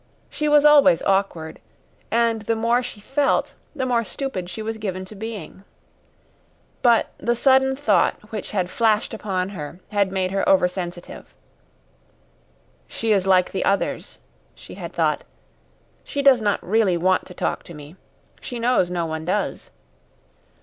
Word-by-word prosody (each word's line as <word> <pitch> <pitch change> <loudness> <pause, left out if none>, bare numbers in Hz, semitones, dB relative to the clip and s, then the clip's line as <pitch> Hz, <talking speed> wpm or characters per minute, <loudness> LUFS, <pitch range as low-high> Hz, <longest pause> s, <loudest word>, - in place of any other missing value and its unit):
She 300 0 -1
was 295 0 +5
always 295 - +6
awkward, 190 -5 -1 0.5
and 230 -1 +1
the 225 +2 -1
more 230 +2 +2
she 245 -4 -8
felt, 275 +6 0 0.2
the 265 -3 -2
more 240 -2 +1
stupid 185 -2 -5
she 220 - -6
was 220 0 -4
given 190 -3 -4
to 185 - -11
being. 205 -3 -8 1.2
But 235 -3 +3
the 240 0 0
sudden 265 +1 +3
thought 290 +2 +2 0.2
which 215 -3 -5
had 185 -3 -2
flashed 220 -1 +1
upon 190 -4 -2
her 170 -3 -8
had 200 -2 +1
made 185 -1 -1
her 195 0 0
over 185 -2 +5
sensitive. 175 -1 -8 1.5
"She 225 -1 -2
is 195 -2 +1
like 185 -1 +3
the 195 - -2
others," 200 0 -1 0.4
she - - -13
had - - -7
thought. - - 0 0.8
"She 280 - -3
does 265 -4 +6
not 205 -2 0
really 200 -3 +2
want 185 +2 +1
to 180 - -12
talk - - -2
to 170 - -11
me. 150 +3 -11 0.5
She 245 - -6
knows 235 -6 +2
no 175 -2 -2
one 160 0 -4
does." 185 +5 -2
205 Hz, 155 wpm, -22 LUFS, 185-235 Hz, 1.5 s, always